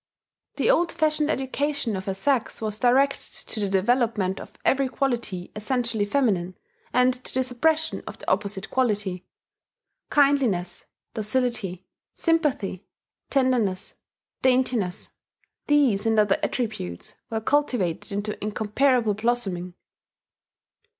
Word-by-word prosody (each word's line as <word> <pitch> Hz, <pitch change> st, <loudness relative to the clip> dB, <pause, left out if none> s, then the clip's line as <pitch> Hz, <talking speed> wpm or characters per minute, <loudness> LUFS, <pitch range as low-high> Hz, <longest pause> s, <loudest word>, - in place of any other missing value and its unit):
The -, -, +3 dB
old 350 Hz, -8 st, +2 dB
fashioned 305 Hz, -1 st, +1 dB
education 275 Hz, -3 st, -1 dB
of 190 Hz, 0 st, -5 dB
her 195 Hz, -, -2 dB
sex 255 Hz, +4 st, 0 dB
was 215 Hz, -1 st, -3 dB
directed 265 Hz, +3 st, +2 dB, 0.2 s
to 220 Hz, -, +1 dB
the 200 Hz, -2 st, 0 dB
development 205 Hz, -1 st, +1 dB
of -, -, -11 dB
every 270 Hz, 0 st, +2 dB
quality 235 Hz, -10 st, -2 dB
essentially 225 Hz, -1 st, 0 dB
feminine, 205 Hz, -8 st, 0 dB, 0.4 s
and 250 Hz, 0 st, +4 dB
to 250 Hz, 0 st, -5 dB
the 260 Hz, -, +2 dB
suppression 315 Hz, +6 st, +1 dB
of -, -, -7 dB
the -, -, -13 dB
opposite 195 Hz, 0 st, -1 dB
quality. 205 Hz, -8 st, 0 dB, 0.8 s
Kindliness, 255 Hz, -12 st, +2 dB, 0.3 s
docility, 215 Hz, -5 st, -1 dB, 0.3 s
sympathy, 295 Hz, -, 0 dB, 0.5 s
tenderness, 240 Hz, -8 st, +1 dB, 0.5 s
daintiness 250 Hz, -8 st, +1 dB, 0.6 s
these 260 Hz, -9 st, +3 dB
and 220 Hz, -1 st, +3 dB
other 205 Hz, -2 st, +3 dB
attributes 215 Hz, -, -3 dB, 0.2 s
were 225 Hz, -, -1 dB
cultivated 220 Hz, -, 0 dB
into 205 Hz, +1 st, -3 dB
incomparable 220 Hz, +2 st, +1 dB
blossoming. 200 Hz, -6 st, -1 dB
230 Hz, 110 wpm, -25 LUFS, 200-265 Hz, 0.8 s, and